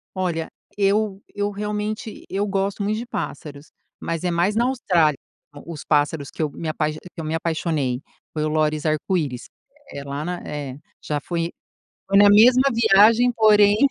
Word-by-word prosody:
Olha, 170 -3 -2 0.3
eu 200 0 +1
eu 205 0 -1
realmente 210 +1 -4
eu 200 +2 -1
gosto 195 0 -1
muito 210 +2 0
de 240 - -6
pássaros. 150 -9 -6 0.3
Mas 165 -1 -3
é 180 - +1
mais 175 +4 +1
na 235 +2 +2
Austrália, 175 - +2 0.5
os 165 -3 -7
pássaros 145 -1 0
que - - -5
eu 150 - 0
me 160 - -6
apai 155 0 -1
que - - -9 0.2
eu - - -5
me 155 +1 -3
apaixonei, 155 -6 -1 0.3
foi 155 -1 -2
o 155 - 0
lóris-arco-íris. 155 -2 -1 0.4
É 140 - -7
lá 140 +2 -5
na 180 +1 -4
é. 145 -2 -6 0.2
Já 150 -1 -2
fui 170 +1 -3 0.6
foi 195 0 +4
na 205 0 +7
mesma 245 +5 +7
viagem 230 +2 +5
porém 210 -2 +5
175 Hz, 165 wpm, -22 LUFS, 155-205 Hz, 0.6 s, na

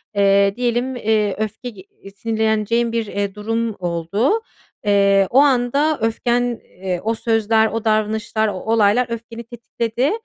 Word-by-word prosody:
Eee, 200 0 +3
diyelim, 245 +1 -1
eee, 215 -4 0
öfke 220 +3 -4
ge 200 -5 -13
iii, 195 +1 -16
sinirleneceğin 220 +2 0
bir, 230 -1 -1
eee, 200 -1 -3
durum 225 +1 -2
oldu. 180 - 0 0.4
Eee, 200 -1 +4
o 260 - +4
anda 280 +2 +2
öfken, 235 +2 +1 0.2
eee, 180 -1 -5
o 225 +2 0
sözler, 220 -1 +2
o 225 0 -4
davranışlar, 215 0 0
o 205 - -2
olaylar 220 +4 +2
öfkeni 230 0 -7
tetikledi. 235 - -2
220 Hz, 140 wpm, -20 LUFS, 205-235 Hz, 0.4 s, Eee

